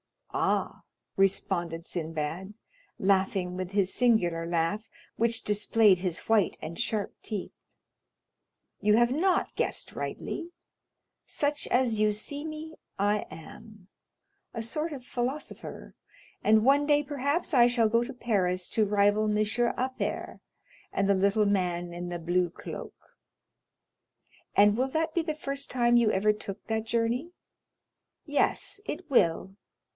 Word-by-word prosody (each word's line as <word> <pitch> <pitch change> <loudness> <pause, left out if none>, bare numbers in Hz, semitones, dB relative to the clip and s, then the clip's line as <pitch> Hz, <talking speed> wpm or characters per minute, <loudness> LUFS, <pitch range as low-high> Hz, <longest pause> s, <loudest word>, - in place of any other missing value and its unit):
"Ah!" - - 0 0.3
responded 175 -3 0
Sinbad, 165 +4 -4 0.4
laughing 190 -2 +1
with 185 0 -4
his 195 -2 +1
singular 175 -9 +2
laugh, 170 +6 -1 0.3
which 230 0 +1
displayed 210 -1 +3
his 180 -2 -2
white 220 -4 +2
and 165 +4 -6
sharp 220 -4 -1
teeth. 210 -4 -5 1.3
"You 210 0 +4
have 240 +1 +4
not 355 +6 +1
guessed - - -1
rightly. 345 +1 -5 0.7
Such 295 0 0
as 245 -4 +2
you 215 0 +3
see 285 +8 -5
me 315 0 -7 0.2
I 205 +1 +1
am, 210 +3 -12 0.6
a 230 - -4
sort 305 +8 -2
of 260 -3 -8
philosopher, 255 +5 -5 0.5
and 215 +1 +4
one 285 +2 +4
day 295 0 +4
perhaps 290 +4 -1
I 240 -3 +7
shall 235 -2 +3
go 230 +2 +3
to 265 +3 -6
Paris 185 -7 0
to 220 - +2
rival 205 +1 +3
Monsieur 215 +3 +1
Appert, 260 +1 -3 0.5
and 195 0 0
the 200 +2 +3
man 175 -3 0
in 175 +1 -5
the 175 - -3
little 165 - -12
blue 175 0 +2
cloak." - - -10 1.4
"And 205 +1 +5
will 260 +2 +2
that 315 +3 -1
be 340 - +2
the 310 -2 -3
first 275 -2 -3
time 240 -1 +3
you 235 -2 +4
ever 210 +1 +3
took 200 -2 -8
that 220 0 -1
journey?" 235 +8 -1 0.9
"Yes; 345 +6 0
it 330 -3 -6
will. 190 -3 +2
215 Hz, 135 wpm, -28 LUFS, 190-255 Hz, 1.4 s, I